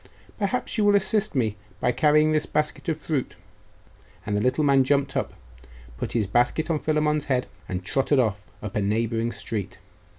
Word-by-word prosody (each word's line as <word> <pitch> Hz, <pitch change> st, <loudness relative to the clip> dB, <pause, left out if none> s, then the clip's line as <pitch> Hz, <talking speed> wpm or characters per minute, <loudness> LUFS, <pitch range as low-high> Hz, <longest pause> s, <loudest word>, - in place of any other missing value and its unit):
Perhaps 225 Hz, +2 st, -1 dB
you -, -, +3 dB
will 205 Hz, 0 st, +5 dB
assist 205 Hz, -1 st, +1 dB
me 110 Hz, -5 st, 0 dB, 0.2 s
by 125 Hz, -, +2 dB
carrying 150 Hz, +4 st, +4 dB
this 155 Hz, -1 st, +1 dB
basket 150 Hz, +2 st, -1 dB
of 160 Hz, -1 st, -1 dB
fruit?' 150 Hz, -4 st, -2 dB, 0.9 s
And 105 Hz, -, -1 dB
the 105 Hz, -, +1 dB
little 130 Hz, +6 st, +1 dB
man 140 Hz, -2 st, +5 dB
jumped 140 Hz, +1 st, +1 dB
up, -, -, -2 dB, 0.6 s
put -, -, -3 dB
his 115 Hz, -3 st, +1 dB
basket 125 Hz, -, +1 dB
on 155 Hz, -, +1 dB
Philammon's 150 Hz, -1 st, +1 dB
head, 130 Hz, -2 st, 0 dB, 0.2 s
and 90 Hz, -1 st, -4 dB
trotted 135 Hz, +5 st, +1 dB
off 105 Hz, -5 st, 0 dB, 0.2 s
up 105 Hz, +2 st, -6 dB
a 105 Hz, -, +1 dB
neighbouring 115 Hz, +3 st, 0 dB
street. 105 Hz, -2 st, -5 dB
135 Hz, 175 wpm, -25 LUFS, 110-155 Hz, 0.9 s, will